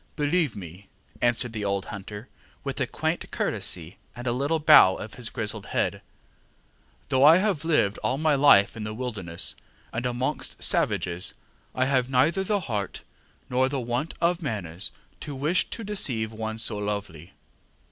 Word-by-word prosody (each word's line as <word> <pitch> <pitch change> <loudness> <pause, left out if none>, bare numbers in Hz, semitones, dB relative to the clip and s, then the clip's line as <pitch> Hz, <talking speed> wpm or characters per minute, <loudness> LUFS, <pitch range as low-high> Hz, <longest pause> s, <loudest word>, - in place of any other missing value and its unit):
ŌĆ£Believe 150 - +1
me, 90 -5 -7
ŌĆØ 95 +4 -20
answered 120 -1 +1
the 105 -2 -3
old 100 -1 -1
hunter, 105 +2 -8 0.4
with - - -4
a - - +1
quaint - - -2
courtesy 85 0 -1 0.2
and 120 - -8
a 120 - +1
little 140 +6 +1
bow 150 -12 +7
of 110 - -7
his 120 -2 -5
grizzled 105 -1 -3
head; - - -1 1.1
ŌĆ£though 130 0 +4
I 155 +4 +9
have 190 -6 0
lived 150 -11 +2
all 130 - 0
my 155 0 +2
life 135 -8 +6
in 110 - -5
the 110 0 -4
wilderness, 105 -9 -4 0.4
and 120 +2 -1
amongst 125 +1 -2
savages, 90 0 0 0.4
I 130 - +2
have 130 -2 +1
neither 145 +9 +3
the 205 0 0
heart, 105 - -4 0.4
nor 130 +1 +2
the 140 0 -1
want 120 +6 -2
of 170 +1 +1
manners, 95 - -4 0.3
to 145 - -6
wish 150 +7 +1
to 230 - -5
deceive 125 - -1
one 110 0 -4
so 110 -2 -2
lovely. 100 -4 -4
120 Hz, 165 wpm, -26 LUFS, 105-145 Hz, 1.1 s, I